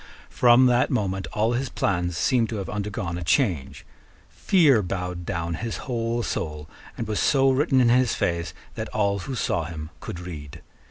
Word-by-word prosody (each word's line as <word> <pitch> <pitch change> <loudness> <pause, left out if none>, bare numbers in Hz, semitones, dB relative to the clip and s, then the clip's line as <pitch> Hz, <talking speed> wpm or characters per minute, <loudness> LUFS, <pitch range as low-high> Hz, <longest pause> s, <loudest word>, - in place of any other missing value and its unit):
From 125 +1 +5
that 125 -1 +3
moment 95 -6 -1
all 110 +2 +1
his 130 +1 -1
plans 90 -6 -1
seem 120 0 +2
to 115 - -5
have 100 -3 -4
undergone 100 -4 -3
a - - -5
change. 85 - 0 0.5
Fear 150 - +4
bowed 90 -2 -4
down 85 -3 -2
his 115 +7 -4
whole 120 -2 -1
soul, 75 -6 -4 0.3
and 115 - -4
was 105 -1 -1
so 135 -2 +4
written 135 0 +2
in 120 -2 +4
his 125 -1 +3
face 85 0 -2 0.2
that 110 -1 -5
all 100 -2 0
who 130 +8 -5
saw 85 -7 -1
him 80 -1 -7
could 85 - -7
read. 80 -5 -9
105 Hz, 175 wpm, -24 LUFS, 85-120 Hz, 0.5 s, From